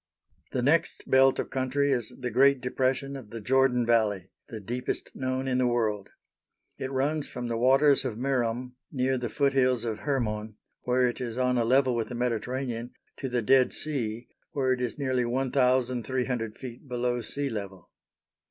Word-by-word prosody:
The 125 Hz, -, -1 dB
next 155 Hz, +5 st, +2 dB
belt 135 Hz, 0 st, +5 dB
of -, -, -3 dB
country 135 Hz, +2 st, +1 dB
is 120 Hz, -5 st, -1 dB
the 125 Hz, -1 st, -3 dB
great 135 Hz, +3 st, +5 dB
depression 130 Hz, +2 st, -1 dB
of 130 Hz, -6 st, -9 dB
the 115 Hz, -, -6 dB
Jordan 125 Hz, +2 st, +2 dB
Valley, 105 Hz, -5 st, +1 dB, 0.2 s
the 110 Hz, -, -6 dB
deepest 120 Hz, +5 st, -4 dB
known 130 Hz, 0 st, -2 dB
in 130 Hz, -1 st, +1 dB
the 125 Hz, -, +3 dB
world. 110 Hz, -5 st, 0 dB, 0.7 s
It 130 Hz, -, -3 dB
runs 140 Hz, +3 st, 0 dB
from 125 Hz, 0 st, -6 dB
"the 115 Hz, -, -1 dB
waters 135 Hz, +4 st, +4 dB
of 120 Hz, -5 st, -3 dB
Merom," 125 Hz, -1 st, -1 dB, 0.2 s
near 130 Hz, -1 st, 0 dB
the 120 Hz, -1 st, -3 dB
foothills 130 Hz, -3 st, +2 dB
of 110 Hz, -2 st, -3 dB
Hermon, 110 Hz, -6 st, -2 dB, 0.3 s
where 125 Hz, 0 st, +3 dB
it 120 Hz, -, -4 dB
is 120 Hz, -1 st, -4 dB
on 125 Hz, 0 st, +2 dB
a -, -, +2 dB
level 130 Hz, +1 st, +3 dB
with 115 Hz, -2 st, -2 dB
the 125 Hz, -, -5 dB
Mediterranean, 120 Hz, 0 st, -2 dB, 0.2 s
to 135 Hz, -, -4 dB
the 120 Hz, -2 st, 0 dB
Dead 130 Hz, +3 st, +4 dB
Sea, 120 Hz, -6 st, -3 dB, 0.3 s
where 130 Hz, -2 st, +2 dB
it 125 Hz, -, -3 dB
is 125 Hz, -, -2 dB
nearly 130 Hz, -3 st, 0 dB
1,300 125 Hz, -2 st, 0 dB
ft. 125 Hz, +1 st, -9 dB
below 125 Hz, -1 st, -1 dB
sea 140 Hz, +3 st, -3 dB
level. 100 Hz, -4 st, -7 dB
125 Hz, 170 wpm, -28 LUFS, 120-135 Hz, 0.7 s, belt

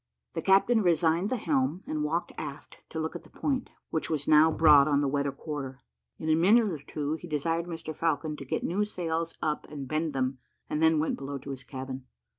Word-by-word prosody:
The 165 Hz, -, -2 dB
captain 195 Hz, +5 st, +4 dB
resigned 170 Hz, +1 st, +2 dB
the 255 Hz, -, 0 dB
helm, 155 Hz, -, 0 dB
and 155 Hz, -1 st, -2 dB
walked 165 Hz, +3 st, -1 dB
aft 140 Hz, +1 st, -7 dB
to 160 Hz, -, -4 dB
look 160 Hz, +2 st, -3 dB
at 175 Hz, -, -5 dB
the -, -, -19 dB
point, 270 Hz, -3 st, -2 dB, 0.2 s
which 160 Hz, -, -1 dB
was 150 Hz, -3 st, -1 dB
now 155 Hz, +1 st, +7 dB
broad 150 Hz, -3 st, +6 dB
on 145 Hz, -2 st, +3 dB
the 145 Hz, -, +1 dB
weather 140 Hz, 0 st, 0 dB
quarter. 135 Hz, -3 st, -6 dB, 0.3 s
In 155 Hz, -, -6 dB
a 155 Hz, -, +4 dB
minute 205 Hz, +6 st, +5 dB
or 155 Hz, -, -4 dB
two, 150 Hz, +2 st, -3 dB
he 175 Hz, -, -8 dB
desired 165 Hz, +2 st, -1 dB
Mr 165 Hz, -2 st, -6 dB
Falcon 160 Hz, -1 st, 0 dB
to -, -, -7 dB
get -, -, -2 dB
new 195 Hz, +5 st, +1 dB
sails 165 Hz, -5 st, -2 dB
up 150 Hz, -1 st, -1 dB
and 140 Hz, -3 st, -6 dB
bend 155 Hz, +1 st, -1 dB
them, 130 Hz, 0 st, -1 dB, 0.3 s
and 150 Hz, -, -2 dB
then 160 Hz, 0 st, +5 dB
went 155 Hz, +1 st, 0 dB
below 140 Hz, +1 st, -4 dB
to 140 Hz, +1 st, -7 dB
his 135 Hz, 0 st, -6 dB
cabin. 130 Hz, -1 st, -7 dB
155 Hz, 220 wpm, -29 LUFS, 140-165 Hz, 0.3 s, now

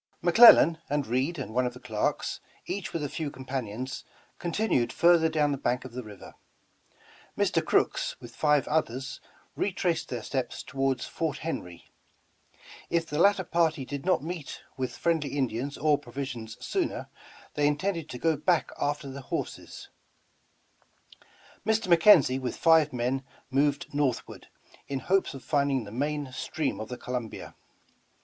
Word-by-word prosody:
McLellan, 175 Hz, -3 st, +8 dB
and 145 Hz, -1 st, 0 dB
Reed 130 Hz, +9 st, 0 dB
one 125 Hz, -1 st, -1 dB
of 125 Hz, -, -6 dB
the -, -, -10 dB
clerks, 110 Hz, -5 st, -2 dB, 0.3 s
each 195 Hz, -1 st, -4 dB
with 165 Hz, -, -3 dB
a -, -, -1 dB
few 150 Hz, +1 st, -4 dB
companions, 130 Hz, -2 st, -5 dB, 0.4 s
contin 205 Hz, +6 st, -1 dB
ued 120 Hz, -2 st, +2 dB
further 170 Hz, -1 st, +4 dB
down 150 Hz, -2 st, +1 dB
the 140 Hz, -, -2 dB
bank 125 Hz, -1 st, -1 dB
of 130 Hz, -, -8 dB
the 125 Hz, +2 st, -5 dB
river; 105 Hz, -4 st, -12 dB, 1.0 s
Mr. -, -, +2 dB
Crooks, -, -, +1 dB
with 120 Hz, -1 st, -12 dB
five 150 Hz, -2 st, +2 dB
others, 135 Hz, -4 st, -2 dB, 0.3 s
retraced 180 Hz, -4 st, -1 dB
their 120 Hz, -3 st, -4 dB
steps 130 Hz, -3 st, -3 dB
toward 135 Hz, -2 st, -1 dB
Fort 160 Hz, -4 st, -3 dB
Henr>\ 90 Hz, -, -5 dB, 1.1 s
If 170 Hz, -1 st, +1 dB
the 150 Hz, -1 st, -3 dB
latter 200 Hz, +1 st, +4 dB
party 165 Hz, -5 st, +1 dB
did 140 Hz, +1 st, -5 dB
not 185 Hz, -4 st, +2 dB
meet 165 Hz, -2 st, -6 dB
with 130 Hz, -1 st, -4 dB
friendly 155 Hz, -4 st, 0 dB
Indians 130 Hz, +1 st, -2 dB
or 150 Hz, -1 st, +2 dB
pro^dsions 120 Hz, -4 st, -6 dB
sooner, -, -, -2 dB, 0.5 s
they 145 Hz, 0 st, +2 dB
intended 165 Hz, +1 st, -1 dB
to 125 Hz, -, -6 dB
go 160 Hz, +4 st, +2 dB
back 165 Hz, +3 st, +1 dB
after 145 Hz, 0 st, -1 dB
the 135 Hz, +1 st, -7 dB
horses; -, -, -6 dB, 1.7 s
Mr. 215 Hz, -4 st, +3 dB
McKenzie 160 Hz, -7 st, +6 dB
with 125 Hz, -2 st, -3 dB
five 160 Hz, -3 st, +5 dB
men 125 Hz, +2 st, -1 dB, 0.3 s
moved 140 Hz, +2 st, +1 dB
northward, 145 Hz, -4 st, -2 dB, 0.4 s
in 140 Hz, -, -2 dB
hopes 190 Hz, -5 st, +1 dB
of 135 Hz, -, -9 dB
finding 140 Hz, -4 st, +1 dB
the 100 Hz, -, -10 dB
main 145 Hz, +3 st, -2 dB
stream 150 Hz, +3 st, -2 dB
of 110 Hz, -, -6 dB
the 125 Hz, -, -5 dB
Columbia. 125 Hz, -3 st, -5 dB
145 Hz, 150 wpm, -28 LUFS, 130-165 Hz, 1.7 s, McLellan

